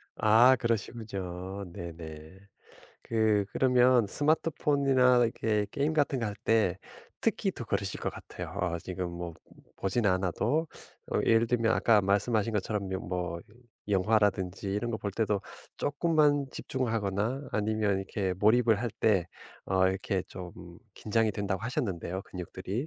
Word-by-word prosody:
아 115 +4 +6
그러시군요. 100 -5 -3
네네. 80 0 -9 0.6
그 110 -3 +2
그러면 125 -2 +4
스마트폰이나 140 -2 +3
이렇게 110 -2 0
게임 145 +6 0
같은 145 -3 +1
거 115 - 0
할 105 - -4
때 105 -5 +2 0.4
특히 - - +1
더 - - -7
그러실 - - -2
것 - - -1
같아요. - - -8
어 85 -1 -1
지금 90 0 -4
뭐 85 -1 -6 0.4
보진 105 +4 0
않아도 100 - +1 0.5
어 - - +2
예를 115 +1 +4
들면 115 -1 +2
아까 110 -3 +4
말씀하신 105 +3 +1
것처럼 105 -1 -2
며 95 - -2
뭐 90 -2 -4 0.5
영화라든지 100 -2 +1
이런 110 +4 -1
거 110 - -2
볼 100 - -3
때도 105 -1 0 0.4
조금만 145 -1 +2
집중하거나 115 +1 -2
아니면 105 -1 +1
이렇게 95 -1 -2
몰입을 110 +2 +3
할 120 - -1
때 95 -6 +3 0.4
어 95 0 +3
이렇게 95 0 -1
좀 90 -2 -9 0.4
긴장이 110 +1 +1
된다고 100 -2 -2
하셨는데요 100 - -2
근육들이. 95 - -5
105 Hz, 295 characters per minute, -29 LUFS, 95-120 Hz, 0.6 s, 아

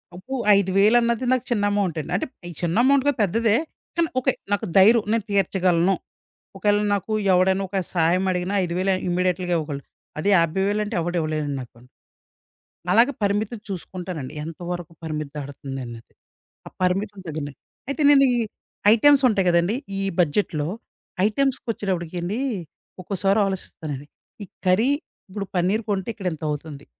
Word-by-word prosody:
అబ్బో! 255 +9 -6 0.2
ఐదు‌వేలన్నది 215 +5 +3
నాకు 255 -1 +2
చిన్న 210 -4 +1
అమౌంట్ 200 -5 0
అండి. - - -9
అంటే, - - 0 0.2
ఈ - - -6
చిన్న 170 -1 0
అమౌంట్ 275 0 +4
గాదు 285 - +2
పెద్దదే. 220 +3 +2 0.4
కానీ 335 -2 +1
ఓ‌కే 260 0 +2 0.2
నాకు 205 - +1
ధైర్యం 220 +4 +7
నేను 225 -3 +1
తీర్చగలను. 185 -2 +2 0.6
ఒకవేళ 205 +1 +2 0.2
నాకు 200 +2 -3 0.2
ఎవడైనా 190 +2 +3
ఒక 195 - -5 0.2
సా‌‌యం 175 +2 +2
అడిగిన 180 +1 -2
5,000 185 +3 0 0.2
ఇమ్మీడియేట్‌ల్‌గా 180 0 0
ఇవ్వగలను. 145 -3 -5 0.3
అది 155 - -1
యాభై‌వేలంటే 195 +5 0
ఎవ‌డు 175 +2 -2
ఇవ్వలేరండి 155 -3 -2
నాకు. 120 -1 -14 1.2
అలాగ 235 +4 +6
పరిమితి 205 +3 0
చూసుకుంటానండి. 180 -6 -6
ఎంత 165 -1 -8
వరకు 175 -2 -5
పరిమితి 155 -3 -4
దాడుతుంది 135 -1 -6
అన్నది. 115 -1 -11 0.5
ఆ - - -7
పరిమితి 195 +3 0
తగ్గిన‌ట్టు. 145 -3 -5 0.3
అయితే 280 +3 -2
నేను 275 -1 +7
ఈ - - +1 0.6
ఐటెమ్స్ 280 +4 +5
ఉంటాయి 195 -4 +1
గదండీ! 170 +5 +2 0.2
ఈ - - -1 0.2
బడ్జెట్‌లో, 155 -2 +1 0.6
ఐటెమ్స్‌కి 265 +3 -1
వచ్చేటప్పటికి 185 -6 -3
అండి 195 +7 -2 0.6
ఒక్కోసారి 195 +2 +1
ఆలోచిస్తానండి. 155 -7 -5 0.4
ఈ - - -7 0.2
కర్రీ 190 +8 +4 0.4
ఇప్పుడు 200 +1 -4
పన్నీర్ 185 +5 +2
కొంటే 195 0 -1
ఇక్కడ 195 -5 -5
ఇంత 160 - -10
అవుతుంది. 145 -1 -6
190 Hz, 140 wpm, -23 LUFS, 165-210 Hz, 1.2 s, ధైర్యం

